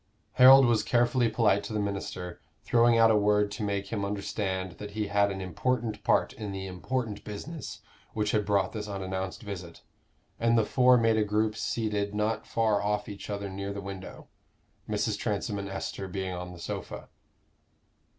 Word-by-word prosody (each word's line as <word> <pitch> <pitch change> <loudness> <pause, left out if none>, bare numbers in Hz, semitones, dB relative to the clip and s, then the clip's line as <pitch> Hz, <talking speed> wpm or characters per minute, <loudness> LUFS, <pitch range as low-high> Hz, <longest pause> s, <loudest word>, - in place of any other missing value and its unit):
Harold 135 +1 +8
was 115 -3 +3
carefully 120 +1 +2
polite 110 -3 +2
to 100 - -6
the 105 - 0
minister, 95 -3 -4 0.2
throwing 120 0 +4
out 115 0 +6
a - - +4
word 105 0 +3
to 100 - -6
make 100 -1 -2
him 105 -3 -2
understand 100 -2 -2
that 105 - -6
he 105 - 0
had 100 0 +3
an 95 -1 -4
important 110 +3 -2
part - - +2
in 105 -2 -6
the 95 0 -5
important 105 +4 -3
business 140 +10 -7 0.3
which 105 -1 0
had 105 - +2
brought 100 -2 +1
this 105 -2 -4
unannounced 95 +1 -4
visit; 90 -5 -8 0.6
and 115 0 +3
the 110 - +3
four 125 +1 +5
made 115 -1 +3
a 110 - +3
group 105 +1 0
seated 105 -3 -2
not 105 +1 -1
far 110 -3 +1
off 105 0 -1
each 100 -1 -8
other 100 -1 -3
near 100 +1 -5
the 100 - -5
window, 100 -1 -8 0.6
Mrs. - - -1
Transome 100 - -2
and 100 0 -5
Esther 95 0 -4
being 95 0 -4
on 90 0 -6
the 90 - -10
sofa. - - -6
105 Hz, 180 wpm, -28 LUFS, 100-110 Hz, 0.6 s, Harold